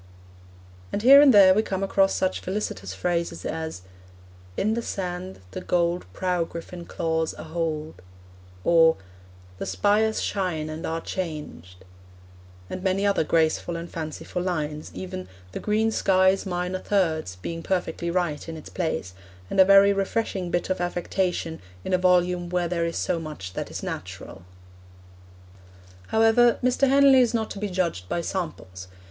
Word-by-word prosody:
And 205 - -2
here 275 +3 +9
and 290 -2 +7
there 195 -4 +8
we 210 - +3
come 195 -3 -3
across 195 0 +2
such 185 0 0
felicitous 180 - -4
phrases 170 - -2
as 160 - -4 0.7
In 215 +2 +1
the 235 - -1
sand 185 - -5
The - - -6
gold 175 - 0
prow 180 - 0
griffin 170 +1 -8
claws 160 -1 -2
a - - -7
hold, 155 - -4 0.6
or 165 -1 +5 0.6
The - - -4
spires 215 +2 +2
Shine 175 -6 -2
and 155 +1 -5
are 165 0 -2
changed, 150 - -6 0.8
and 185 - -6
many 190 +1 0
other 200 -4 +2
graceful 160 +1 +1
or 170 - -5
fanciful 165 +2 -5
lines, 155 -4 -3
even 185 0 -6 0.2
'the - - -5
green 220 +1 +1
sky's 190 -1 +3
minor 180 +1 -2
thirds' 160 - 0
being 165 - -6
perfectly 175 -2 -2
right 170 -4 -1
in 160 - -6
its 155 - -10
place, 160 - -3 0.4
and 195 - 0
a 190 - +9
very 195 +1 +7
refreshing 195 -2 -2
bit 175 +2 -1
of 185 - -1
affectation 175 -1 -2 0.2
in - - -2
a 185 - +3
volume 180 -1 +2
where 175 -1 0
there 170 -1 -1
is 165 - -4
so 170 - 0
much 150 - -7
that - - -4
is - - -6
natural. 85 - -7 1.6
However, 225 +2 +4
Mr. 255 +2 +3
Henley 275 -1 +6
is 240 -1 +2
not 220 -1 -1
to 200 - -6
be 210 0 -2
judged 170 - -2
by 170 - -1
samples. 155 - -5
180 Hz, 155 wpm, -25 LUFS, 160-195 Hz, 1.6 s, here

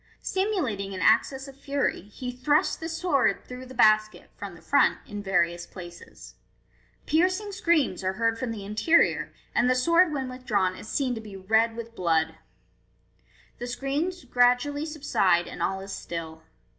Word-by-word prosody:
Simulating 275 - -1
an - - -5
access 265 +7 +3
of 275 - -11
fury, 275 0 -1
he 210 +6 -7
thrusts 260 +4 +1
the 325 - -6
sword 325 -5 +1
through 250 +1 -9
the 260 - -11
basket 215 -2 +3
(from 200 -3 -7
the 165 - -15
front) 285 - +3
in 205 0 -6
various 175 -3 0
places. 175 -2 -11 0.7
Piercing 370 +6 +1
screams 315 - +1
are 185 0 0
heard 230 +2 0
from 255 - -2
the 215 -3 -5
interior, 220 +12 +2 0.2
and 250 - +3
the 255 - +3
sword 335 +6 +4
when 270 -3 -2
withdrawn 215 -8 -1
is - - -10
seen 265 -3 0
to 225 - -5
be 205 -3 -10
red 220 +4 +2
with 230 0 -7
blood. 160 -4 +1 1.3
The 245 - -4
screams 285 +8 -2
gradually 250 +4 +2
subside, 195 - +1
and - - -8
all 190 0 -1
is 195 +1 -8
still. 160 -1 -6
245 Hz, 160 wpm, -26 LUFS, 195-285 Hz, 1.3 s, sword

